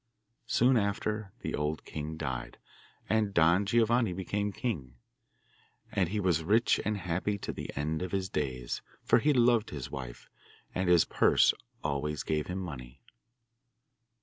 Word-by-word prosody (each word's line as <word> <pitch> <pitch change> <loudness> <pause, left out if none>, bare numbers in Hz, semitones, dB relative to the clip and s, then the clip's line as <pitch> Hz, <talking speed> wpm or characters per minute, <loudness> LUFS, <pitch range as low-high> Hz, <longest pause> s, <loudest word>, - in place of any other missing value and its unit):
Soon 125 +3 +4
after 105 0 -1
the - - -3
old 75 +1 -2
king 75 +1 -5
died, 65 -5 -4 0.5
and 110 -2 +1
Don 85 +4 +4
Giovanni 115 -1 +3
became 100 +3 -2
king. 80 - -4 1.0
And 95 -6 +1
he 105 +2 -1
was 90 -5 +2
rich 105 +5 +3
and 105 0 -1
happy 95 +3 -1
to - - -5
the - - -6
end 75 +2 -1
of 90 - -3
his 95 -1 -1
days, 65 -7 -3 0.2
for - - +4
he 150 +6 +3
loved 120 -4 +3
his 70 -4 -6
wife, 65 -3 -7 0.5
and 90 -1 0
his 85 -2 +6
purse - - +4 0.3
always 75 0 -2
gave 75 -1 -1
him 90 - -3
money. 65 -8 -7
90 Hz, 150 wpm, -30 LUFS, 75-105 Hz, 1.0 s, his